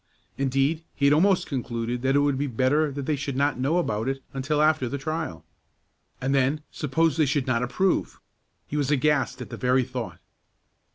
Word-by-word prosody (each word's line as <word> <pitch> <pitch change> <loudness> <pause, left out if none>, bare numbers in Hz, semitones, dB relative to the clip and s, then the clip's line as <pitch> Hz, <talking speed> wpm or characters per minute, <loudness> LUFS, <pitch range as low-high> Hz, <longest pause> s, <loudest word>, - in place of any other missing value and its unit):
Indeed, 135 +4 0
he 140 - 0
had 140 - +6
almost 185 +4 +3
concluded 120 -2 -3
that 135 +1 +2
it 145 - +5
would 145 -1 +2
be 145 - 0
better 135 +5 +1
that 140 0 -5
they 155 - +1
should 140 -1 -4
not 140 -1 +1
know 140 +7 +1
about 110 -10 -1
it 135 0 -4
until 140 +3 -1
after 155 -4 +3
the 140 - -3
trial. 145 - -4 0.7
And 135 +2 -1
then 140 +3 +1
suppose 160 +2 0
they 155 -3 +3
should 140 -1 0
not 120 -2 +1
approve! 175 +10 0 0.5
He 150 - -4
was 140 -2 0
aghast 150 0 +1
at - - -13
the - - -5
very 125 0 +2
thought. 125 -2 -5
140 Hz, 190 wpm, -25 LUFS, 130-150 Hz, 0.7 s, had